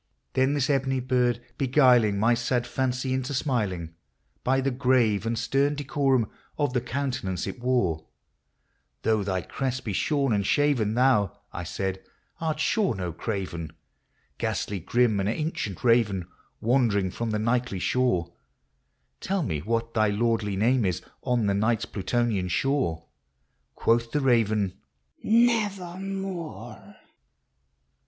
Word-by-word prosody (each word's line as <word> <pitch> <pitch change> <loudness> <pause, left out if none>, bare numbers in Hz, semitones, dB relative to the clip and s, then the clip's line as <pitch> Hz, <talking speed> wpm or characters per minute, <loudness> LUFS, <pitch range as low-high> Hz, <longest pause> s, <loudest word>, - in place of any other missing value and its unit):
Then 130 +2 +2
this 140 -2 +1
ebony 135 -2 +1
bird 125 -1 +1
beguiling 125 -6 +4
my 115 +4 +3
sad 120 +1 0
fancy 130 0 -1
into 130 +2 -2
smiling, 100 - -1 0.5
By 135 +1 +2
the 135 +1 0
grave 120 -5 +2
and 115 0 -1
stern 135 +5 +1
decorum 135 -4 +1 0.3
of 145 -4 0
the 125 - +1
countenance 125 -8 -2
it - - -6
wore, 120 -11 0 0.5
" - - -47
Though 110 -1 +2
thy 95 -2 -1
crest 130 -1 -3
be 105 - -2
shorn 140 +3 +1
and 100 -1 +1
shaven, 125 -4 +2
thou," 125 -6 +3 0.2
I 90 - -4
said, 95 +2 -3 0.2
" - - -35
art 155 -2 -1
sure 205 +4 +1
no 90 -3 -4
craven; 85 -5 -4 0.7
Ghastly, 100 -2 -2
grim, 115 +3 +2
and 100 +1 0
ancient 115 - -3
raven, 110 -7 +3 0.3
wandering 110 -6 +2
from 115 +4 -3
the 105 - 0
nightly 115 -1 0
shore, 90 -6 0 0.9
Tell 195 -2 -1
me 80 - -2
what 115 +6 -2
thy 110 -1 +3
lordly 105 -1 0
name 120 +5 +2
is 90 -4 -1 0.2
on 120 -3 +1
the 100 - +2
night's 110 +3 +1
Plutonian 105 -2 -1
shore? 90 - 0 0.4
" - - -47
Quoth 115 0 +1
the 150 - +1
raven, 110 -7 +2 0.3
" 65 - -38 0.2
Nevermore 195 -5 -4
120 Hz, 140 wpm, -26 LUFS, 100-135 Hz, 0.9 s, beguiling